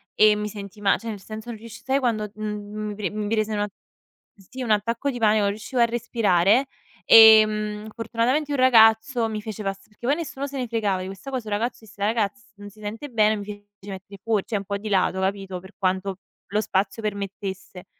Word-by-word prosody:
e 215 Hz, 0 st, +6 dB
mi 210 Hz, 0 st, -3 dB
sentii 205 Hz, 0 st, -9 dB
ma 200 Hz, -1 st, +3 dB
cioè 230 Hz, -, -7 dB
nel 205 Hz, -3 st, -6 dB
senso 215 Hz, +3 st, -8 dB
non 230 Hz, -, -5 dB
riusci 230 Hz, +1 st, -11 dB
sai 270 Hz, +1 st, +1 dB
quando 220 Hz, -5 st, -1 dB
mhmm, 210 Hz, 0 st, -5 dB
mi 210 Hz, -, -5 dB
pre 200 Hz, -3 st, -2 dB
mi 210 Hz, 0 st, -4 dB
prese 215 Hz, 0 st, 0 dB
un 210 Hz, -, -1 dB
a 205 Hz, -, 0 dB, 0.7 s
sì, 235 Hz, +7 st, -9 dB
un 225 Hz, -, -1 dB
attacco 230 Hz, +6 st, 0 dB
di 245 Hz, -, -6 dB
panico, 215 Hz, -1 st, +4 dB
non 200 Hz, -, +2 dB
riuscivo 220 Hz, +5 st, -4 dB
a -, -, +7 dB
respirare. 230 Hz, -1 st, +2 dB, 0.4 s
Ehm, 215 Hz, -1 st, +7 dB
fortunatamente 250 Hz, +6 st, 0 dB
un 285 Hz, -, 0 dB
ragazzo 225 Hz, -1 st, +5 dB
mi 215 Hz, -1 st, -4 dB
fece 215 Hz, 0 st, -6 dB
pass 195 Hz, 0 st, -5 dB
perché 220 Hz, +3 st, -9 dB
poi 285 Hz, -, +3 dB
nessuno 285 Hz, -4 st, -5 dB
se 275 Hz, -, -7 dB
ne 255 Hz, -2 st, -2 dB
fregava 210 Hz, -5 st, -1 dB
di -, -, -5 dB
questa 195 Hz, +8 st, -8 dB
cosa, 250 Hz, -5 st, -4 dB
il 210 Hz, -, -2 dB
ragazzo 235 Hz, +4 st, -2 dB
disse: 205 Hz, -1 st, -15 dB
"Ragazzi, 220 Hz, +3 st, -1 dB
non 205 Hz, 0 st, -10 dB
si 215 Hz, +2 st, -20 dB
sente 220 Hz, +7 st, -6 dB
bene", 215 Hz, -3 st, +3 dB
mi 205 Hz, -, -6 dB
fece 205 Hz, 0 st, -10 dB, 0.2 s
mettere 195 Hz, +1 st, -10 dB
fuori 220 Hz, -4 st, +1 dB
cioè 215 Hz, -, -2 dB
un 200 Hz, -, -6 dB
po' 200 Hz, +1 st, -2 dB
di 215 Hz, +2 st, -6 dB
lato, 190 Hz, -1 st, +1 dB
capito, 190 Hz, -1 st, -2 dB
per 190 Hz, +1 st, -15 dB
quanto 190 Hz, 0 st, -1 dB, 0.3 s
lo 210 Hz, +3 st, 0 dB
spazio 205 Hz, +2 st, -1 dB
permettesse. 195 Hz, -2 st, -5 dB
215 Hz, 220 wpm, -24 LUFS, 200-230 Hz, 0.7 s, a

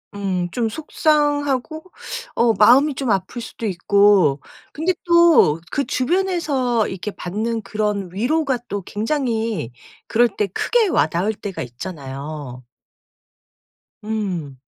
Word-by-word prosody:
음. 185 Hz, -3 st, -2 dB
좀 230 Hz, +3 st, -1 dB
속상하고 295 Hz, +1 st, 0 dB, 0.5 s
어 235 Hz, -1 st, +3 dB
마음이 255 Hz, +8 st, +5 dB
좀 250 Hz, -4 st, -1 dB
아플 195 Hz, +5 st, -2 dB
수도 230 Hz, 0 st, -7 dB
있고 190 Hz, -5 st, +3 dB, 0.3 s
근데 335 Hz, +5 st, 0 dB
또 340 Hz, 0 st, +6 dB, 0.4 s
그 280 Hz, -, 0 dB
주변에서 280 Hz, -, 0 dB
이렇게 195 Hz, +2 st, -5 dB
받는 220 Hz, +6 st, -3 dB
그런 205 Hz, -2 st, -2 dB
위로가 265 Hz, -, 0 dB
또 205 Hz, -1 st, -3 dB
굉장히 225 Hz, -, -2 dB, 0.4 s
그럴 240 Hz, +2 st, +4 dB
때 210 Hz, -1 st, -2 dB
크게 445 Hz, -, +1 dB
와닿을 180 Hz, -, +1 dB
때가 200 Hz, -2 st, -6 dB
있잖아요. 135 Hz, -1 st, -7 dB, 1.4 s
음. 190 Hz, -10 st, -3 dB
220 Hz, 220 characters per minute, -21 LUFS, 185-275 Hz, 1.4 s, 또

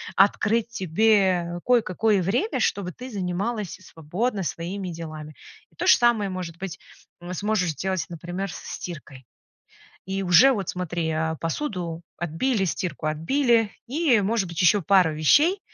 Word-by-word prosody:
открыть 215 Hz, +3 st, +3 dB
тебе 185 Hz, -3 st, +2 dB
кое-какое 220 Hz, -4 st, +2 dB
время, 235 Hz, -, 0 dB
чтобы 190 Hz, -3 st, 0 dB
ты 255 Hz, +1 st, -9 dB
занималась 195 Hz, +2 st, -3 dB
и -, -, -22 dB
свободно 185 Hz, +7 st, -3 dB
своими 180 Hz, +4 st, -4 dB
делами. 155 Hz, -3 st, -8 dB, 0.4 s
И -, -, -28 dB
то -, -, -3 dB
же -, -, +8 dB
самое, 235 Hz, -5 st, +2 dB
может 180 Hz, -3 st, -6 dB
быть, 190 Hz, -1 st, -6 dB, 0.4 s
м, 175 Hz, +1 st, -6 dB
сможешь 200 Hz, -2 st, 0 dB
сделать, 185 Hz, +2 st, -2 dB
например, 175 Hz, +3 st, -5 dB
со -, -, -9 dB
стиркой. 140 Hz, -6 st, -9 dB, 0.9 s
И 195 Hz, 0 st, -1 dB
уже 190 Hz, +9 st, +6 dB
вот, 200 Hz, -7 st, -3 dB
смотри, 175 Hz, -2 st, -3 dB
э, 160 Hz, 0 st, -1 dB
посуду 170 Hz, -, -3 dB
отбили, 190 Hz, -, -1 dB
стирку 170 Hz, -4 st, -3 dB
отбили 225 Hz, -, +2 dB, 0.2 s
и, 270 Hz, -3 st, +2 dB
может 200 Hz, -2 st, 0 dB
быть, 170 Hz, 0 st, -2 dB
ещё 200 Hz, +4 st, +5 dB
пару 180 Hz, -3 st, +4 dB
вещей, 295 Hz, -, +4 dB
185 Hz, 145 wpm, -24 LUFS, 170-220 Hz, 0.9 s, же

